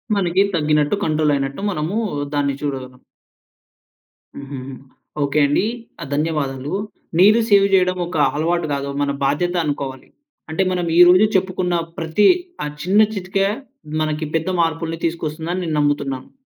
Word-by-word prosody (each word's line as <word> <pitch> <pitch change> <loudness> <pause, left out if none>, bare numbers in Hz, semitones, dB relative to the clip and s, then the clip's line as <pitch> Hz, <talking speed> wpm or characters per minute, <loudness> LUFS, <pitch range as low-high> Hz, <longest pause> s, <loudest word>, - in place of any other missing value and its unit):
మనకి 185 -1 +2
తగ్గినట్టు, 150 +2 +2
కంట్రోల్ 155 -1 +2
అయినట్టు 135 +5 -3
మనమూ 170 +5 -2 0.4
దాన్ని 140 -1 0
చూడగలం. 130 -3 -5 1.4
హుహుహు, 135 -1 -7 0.5
ఓకే 140 +2 +1
అండి. 145 +5 +2 0.4
ఆహ్, 140 - -7
ధన్యవాదాలు. 145 -2 -2 0.5
నీరు 210 +4 +6
సేవ్ 200 -1 +6
చేయడం 185 -1 +3
ఒక 175 - -4 0.2
అలవాటు 165 +1 0
గాదు. 140 0 -3
మన 140 0 +1
బాధ్యత 175 +6 0
అనుకోవాలి. 140 -3 -4 0.4
అంటే 160 +5 0
మనం 180 -1 -1
ఈ - - +6
రోజు 185 +4 +6
చెప్పుకున్న 185 -1 0 0.2
ప్రతీ 165 +5 +2 0.4
ఆ - - -2 0.2
చిన్న 195 +4 +4
చిట్కా 195 0 0 0.5
మనకి 155 0 -1
పెద్ద 160 +3 0
మార్పులు 165 0 -2
తీసుకొస్తుందని 165 +2 -4
నేను 155 -2 -1
నమ్ముతున్నాను. 140 -3 -1
155 Hz, 130 wpm, -20 LUFS, 145-180 Hz, 1.4 s, నీరు